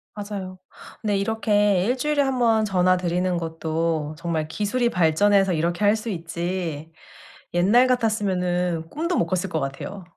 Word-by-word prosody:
맞아요. 195 -3 -6 0.4
근데 205 -3 0
이렇게 205 -2 +1
1 250 +3 0
주일에 295 +2 +1
1 270 -1 +1
번 225 -3 +3
전화 185 -2 +2
드리는 180 0 -1
것도 160 -1 -2
정말 165 -2 -2
기술이 215 +8 0
발전해서 190 +3 +3
이렇게 170 +4 -1
할 205 +2 +5
수 225 +1 -5
있지 170 -2 -4 0.6
옛날 210 +9 +4
같았으면은 180 -8 0
꿈도 335 +3 -2
못 - - +2
꿨을 185 0 -1
것 160 - -1
같아요. 140 +8 -5
185 Hz, 300 characters per minute, -23 LUFS, 170-215 Hz, 0.6 s, 할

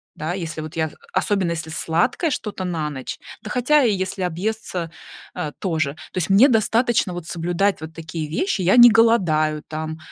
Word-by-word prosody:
Да, 160 +3 -3
если 165 -4 -5
вот 155 0 -8
я 160 -2 -1 0.2
особенно 190 -1 0
если 160 -1 -4
сладкое 170 - 0
что-то 210 -8 -4
на 165 -4 -2
ночь, 130 -3 -6 0.2
да, 215 - -8
хотя 255 +6 +3
и 235 - +3
если 190 0 -3
объесться, 180 -1 -3 0.4
а, 155 -5 -4
тоже. 160 -6 -1 0.2
То - - -7
есть, 170 - -2
мне 210 +9 +6
достаточно 230 -3 +2
вот 175 -2 -6
соблюдать 175 +3 -1
вот 160 0 -8
такие 165 -1 -5
вещи. 200 - -1
Я 185 +6 +4
не 240 -1 +10
голодаю, 170 -10 +3
там, 155 0 -5
180 Hz, 180 wpm, -22 LUFS, 160-215 Hz, 0.4 s, не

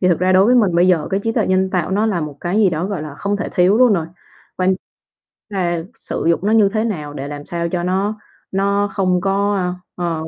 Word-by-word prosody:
thì 180 - +3
thực 170 - +2
ra 185 +1 +2
đối 185 +1 +5
với 250 - +4
mình 205 -8 +3
bây 175 +2 +4
giờ 175 -4 +2
cái 195 0 0
trí 225 +2 -1
tuệ - - 0
nhân 185 0 +1
tạo 180 -1 -1
nó 210 +3 +1
là 195 -6 0
một 150 -2 -5
cái 175 +3 -2
gì 210 -4 +4
đó, 165 +2 -2
gọi 195 -6 -4
là, 150 -2 -7
không 200 0 -1
thể 200 - -3
thiếu 185 +3 +4
luôn 250 -4 +6
rồi, 165 -4 0 0.5
quan 185 0 +2 0.8
là 175 -4 -1
sử - - -5
dụng 170 - +3
nó 210 - +1
như 215 -3 +5
thế 215 +2 -1
nào 155 -10 -4
để 140 -1 -5
làm 145 0 -7
sao 170 0 -3
cho 175 0 -2
nó 195 +4 -1 0.3
nó 200 +1 +1
không 185 -2 +1
có, 200 +1 +1
ơ, 180 -2 -1 0.4
ờ 160 0 -5
185 Hz, 255 wpm, -19 LUFS, 170-200 Hz, 0.8 s, luôn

